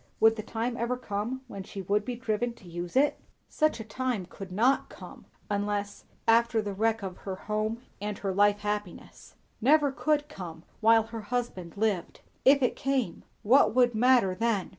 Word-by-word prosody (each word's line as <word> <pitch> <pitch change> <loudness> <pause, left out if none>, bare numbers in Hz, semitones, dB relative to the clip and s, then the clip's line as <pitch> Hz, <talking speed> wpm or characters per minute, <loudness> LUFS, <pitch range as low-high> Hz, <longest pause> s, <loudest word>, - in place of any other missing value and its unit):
Would 225 0 +6
the 215 - -4
time 230 +2 -3
ever 240 +2 -1
come 240 +2 -3
when 200 -5 -7
she 195 +1 -7
would 205 +3 +1
be 250 - -3
driven 235 0 -1
to 190 - -16
use 175 +2 -6
it? 285 +3 +3 0.3
Such 310 -6 +1
a - - -4
time 225 -2 -2
could 190 +1 -10
not 240 +8 +2
come, - - -12 0.2
unless 205 0 -2 0.2
after 230 0 +4
the 205 -2 -2
wreck 220 +2 0
of 185 -2 -5
her 190 -1 -5
home 215 +4 -3 0.2
and 210 -1 -3
her 195 -2 -2
life 205 +1 +3
happiness; 210 -2 -5 0.3
never 285 +3 +4
could 295 +1 0
come 175 - -8 0.2
while 225 0 +5
her 225 0 -7
husband 205 -6 -4
lived. 200 -5 -1 0.2
If 275 +1 +6
it 250 - +2
came, 260 -10 -1 0.2
what 225 -1 +5
would 245 -1 +4
matter 235 -4 +4
then? 215 -1 0
220 Hz, 180 wpm, -28 LUFS, 200-245 Hz, 0.3 s, Would